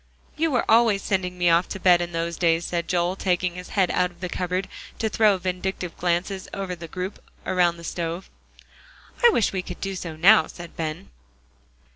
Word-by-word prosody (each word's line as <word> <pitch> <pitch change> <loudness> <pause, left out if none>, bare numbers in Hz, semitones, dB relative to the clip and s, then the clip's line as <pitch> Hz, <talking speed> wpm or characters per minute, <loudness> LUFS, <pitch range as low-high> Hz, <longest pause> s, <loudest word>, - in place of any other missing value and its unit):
"You 325 +2 +1
were 250 -5 +1
always 225 -3 +4
sending 180 -2 -1
me 175 -1 +3
off 170 +2 +3
to 195 - -5
bed 180 -2 +5
in 175 0 -3
those 170 0 -2
days," 165 0 +2
said 170 -1 -2
Joel, 175 +1 0
taking 180 -2 0
his 180 0 -9
head 185 -3 +3
out 180 0 +1
of 175 -1 -21
the 180 -1 -4
cupboard 180 +2 -2 0.3
to 220 - -1
throw 210 -2 +3
vindictive 180 -1 -3
glances 180 +2 -1
over 195 -2 -3
to 175 - -9
the 165 - -7
group 185 +4 -5 0.2
around 175 -2 +2
the 170 - -11
stove. 170 +1 -4 1.0
"I 480 - +9
wish 235 - +1
we 190 - -1
could 180 -1 -8
do 195 0 -3
so 170 -3 -6
now," 175 +1 +6
said 175 -1 -11
Ben. 155 - -5
180 Hz, 200 wpm, -24 LUFS, 170-190 Hz, 1.0 s, I